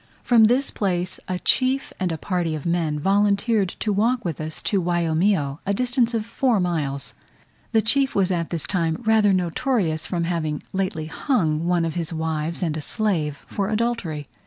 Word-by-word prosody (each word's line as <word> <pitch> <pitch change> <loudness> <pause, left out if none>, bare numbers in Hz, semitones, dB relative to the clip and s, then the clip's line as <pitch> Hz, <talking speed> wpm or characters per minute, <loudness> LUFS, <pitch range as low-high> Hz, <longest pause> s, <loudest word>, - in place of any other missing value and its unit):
From 230 -3 +6
this 250 +5 +2
place 180 -3 -1
a 185 - -2
chief 260 +7 +2
and 185 -2 0
a 165 - -2
party 175 -2 -1
of 150 - -7
men 165 -3 0
volunteered 200 +3 +2
to 210 - +1
walk 230 +3 +1
with 160 -3 -3
us 155 0 -5
to 200 -3 +1
Waiomio, 170 -3 +1
a 200 0 0
distance 245 0 +1
of 220 -2 -1
four 235 -1 +1
miles. 150 -6 -2 0.6
The 220 -2 +3
chief 270 +4 +2
was 190 -1 +2
at 170 -2 -1
this 170 -3 -3
time 165 +1 -1
rather 220 -2 +4
notorious 180 - 0
from 175 -2 -1
having 165 -3 -2
lately 185 -5 -2
hung 165 - 0
one 175 -1 +2
of 165 - -2
his 170 -2 -2
wives 160 +1 -2
and 160 -3 -1
a 155 - -3
slave 160 -7 -1
for 200 -1 -2
adultery. 215 -10 -1
180 Hz, 180 wpm, -23 LUFS, 160-215 Hz, 0.6 s, From